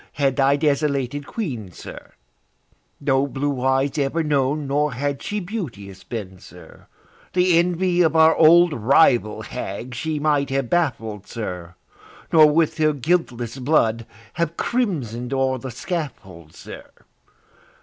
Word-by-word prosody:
had 135 -2 0
thy 140 0 +3
desolated 145 -2 -1
Queen, 125 - -5
sir, - - -11 0.9
No 135 0 +1
blue 140 -1 -3
eyes 135 +2 +1
ever 145 +4 0
known, 145 0 0
nor 145 +1 0
had 140 +2 -3
she 210 - -3
beauteous 120 - -7
been, 95 -6 -7
sir, - - -15 0.5
The 180 -2 +4
envy 180 +1 +1
of 160 -2 +2
our 160 0 +6
old 170 +1 +6
rival 120 -2 +3
hag 115 +6 -6
she 155 +5 -3
might 145 -2 +1
have 135 -2 -2
baffled, 115 - -1
sir, 90 -6 -6 0.6
Nor 155 -2 +7
with 160 0 +1
her 155 -1 +3
guiltless 130 -5 -1
blood 115 -5 +1 0.3
have 170 0 -2
crimson'd 135 - -2
o'er 130 -1 0
the 130 - -7
scaffold, 120 - -6
sir. - - -10
140 Hz, 130 wpm, -22 LUFS, 120-160 Hz, 0.9 s, Nor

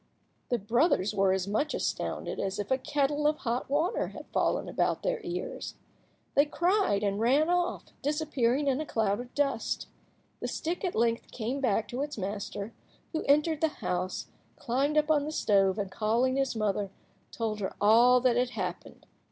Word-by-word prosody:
The 245 - +2
brothers 220 - +2
were 195 -2 +3
as 190 0 0
much 220 +10 0
astounded - - -3
as 195 0 -2
if 205 +2 -4
a 260 - +3
kettle 290 +2 +1
of 305 0 +2
hot 240 +1 -2
water 310 +6 +1
had - - -9
fallen - - +1
about - - 0
their - - -1
ears. 375 +8 -5 0.6
They 285 +1 +4
cried 345 - +2
out - - +2
and 200 +1 -1
ran 280 +9 +3
off, 355 0 0 0.2
disappearing 290 -3 +1
in 275 +1 +1
a - - -3
cloud 210 -2 0
of 245 0 -7
dust. 285 -1 0 0.5
The - - -3
stick 340 +4 -3
at 365 - -1
length 230 0 +1
came 250 +4 -3
back 225 -4 +1
to 250 +3 -3
its 295 -2 -4
master, 200 +2 -4 0.4
who 315 - -1
entered 300 +2 +3
the 320 - +4
house, 185 - -3 0.3
climbed 275 +5 0
up 305 +1 +3
on 295 -2 +3
the 305 - -3
stove, 195 -8 +2
and, 200 -2 -3
calling 230 +6 +1
his 270 -3 0
mother, 205 -2 0 0.4
told 220 -2 -2
her 190 - -3
all 235 +4 +6
that 245 -1 +3
had 250 0 +2
happened. 185 -7 -6
250 Hz, 180 wpm, -29 LUFS, 210-295 Hz, 0.6 s, all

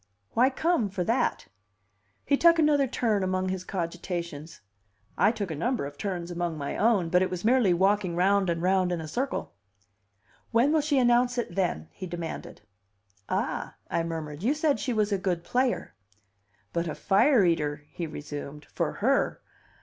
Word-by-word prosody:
"Why 250 +3 +4
come 275 - +1
for 185 -1 -2
that?" 230 +8 0 0.8
He 285 - +3
took 335 +3 +5
another 295 -3 +3
turn 225 -4 0
among 185 0 0
his 185 -1 -3
cogitations. 170 -3 -5 0.5
I 205 - +4
took 205 -6 -4
a - - -3
number 235 - -1
of 145 0 -7
turns 175 +1 -4
among 170 -2 -2
my 140 -1 -4
own, 205 -6 +2
but 180 +1 +4
it 185 - +1
was 180 +1 -5
merely 240 -5 +4
walking 190 0 +2
round 195 +1 +3
and 170 0 -1
round 185 -1 +2
in 175 - -1
a 160 - -6
circle. 260 - -3 1.0
"When 245 +6 +3
will 315 - +4
she 290 -1 +1
announce 245 0 +3
it, 235 -8 -2
then?" 175 - -1
he 185 - -7
demanded. 170 -1 -6 0.7
"Ah!" - - -2 0.2
I - - +1
murmured. 160 -2 -5
"You 255 +9 +1
said 300 -2 +1
she 260 - -2
was 215 -2 +1
a 200 - +1
good 180 -3 -1
player." 250 - 0 0.8
"But 170 0 -1
a 155 - -3
fire 205 +3 +4
eater!" 150 -3 0
he 170 - -4
resumed. 145 -1 -7
"For - - -1
her. - - +2
185 Hz, 170 wpm, -27 LUFS, 170-240 Hz, 1.0 s, took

